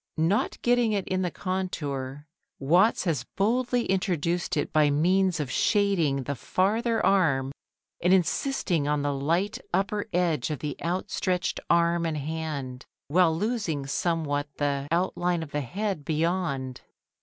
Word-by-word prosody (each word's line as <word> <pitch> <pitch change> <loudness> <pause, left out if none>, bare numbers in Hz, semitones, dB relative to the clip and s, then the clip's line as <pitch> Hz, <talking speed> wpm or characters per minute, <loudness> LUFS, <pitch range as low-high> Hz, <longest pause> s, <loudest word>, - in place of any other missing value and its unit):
Not 165 +6 +1
getting 240 -2 +3
it 200 -2 -1
in 185 0 0
the 180 - 0
contour, 145 -8 -4 0.3
Watts 175 +11 +3
has 155 -9 0
boldly 240 +4 +1
introduced 175 -3 0
it 145 - -2
by 150 -1 +4
means 180 +5 +2
of 140 -4 -3
shading 175 -11 +2
the 140 - -3
farther 215 - 0
arm 140 -9 +2 0.5
and 180 - +3
insisting 180 - +1
on 150 -1 0
the 145 0 0
light 165 +9 0
upper 205 +3 0
edge 165 -7 +1
of 150 - -2
the 150 0 -4
outstretched 180 0 -1
arm 170 0 +3
and 155 -1 -2
hand, 145 -4 -4 0.3
while 165 0 +3
losing 200 - -1
somewhat 145 -1 -1
the, 140 -1 -1
outline 175 0 0
of 150 - -10
the 150 - -1
head 195 - -3
beyond. 155 -5 -1
170 Hz, 140 wpm, -27 LUFS, 145-190 Hz, 0.5 s, by